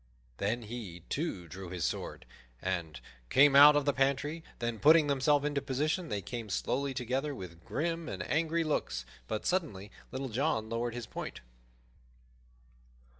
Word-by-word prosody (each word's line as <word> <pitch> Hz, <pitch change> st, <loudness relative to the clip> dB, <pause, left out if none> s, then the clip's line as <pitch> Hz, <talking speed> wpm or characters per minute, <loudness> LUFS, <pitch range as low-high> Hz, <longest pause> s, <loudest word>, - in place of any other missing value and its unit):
Then 115 Hz, +4 st, -1 dB
he, 105 Hz, -6 st, -7 dB
too, 140 Hz, -, -2 dB
drew 90 Hz, +3 st, -8 dB
his 90 Hz, -2 st, -2 dB
sword -, -, -4 dB, 0.3 s
and 85 Hz, -3 st, -3 dB, 0.3 s
came 140 Hz, +1 st, +6 dB
out 145 Hz, +1 st, +10 dB
of 145 Hz, -1 st, +2 dB
the 145 Hz, -, +2 dB
pantry; 140 Hz, +4 st, 0 dB
then, 120 Hz, -2 st, -3 dB
putting 155 Hz, +1 st, +7 dB
themselves 145 Hz, +1 st, +2 dB
into 145 Hz, -1 st, 0 dB
position, 150 Hz, +6 st, -1 dB
they 105 Hz, -3 st, -2 dB
came 115 Hz, +1 st, -5 dB
slowly 135 Hz, +7 st, -1 dB
together, 135 Hz, +3 st, -1 dB
with 85 Hz, -5 st, -9 dB
grim 165 Hz, -, -2 dB
and -, -, -4 dB
angry 165 Hz, +2 st, +1 dB
looks; 65 Hz, -, -1 dB, 0.2 s
but 110 Hz, -, -3 dB
suddenly 135 Hz, -, -1 dB, 0.2 s
Little 130 Hz, 0 st, -4 dB
John 115 Hz, -2 st, 0 dB
lowered 115 Hz, +1 st, -2 dB
his 120 Hz, -2 st, -4 dB
point. -, -, -6 dB
130 Hz, 150 wpm, -31 LUFS, 105-150 Hz, 0.3 s, out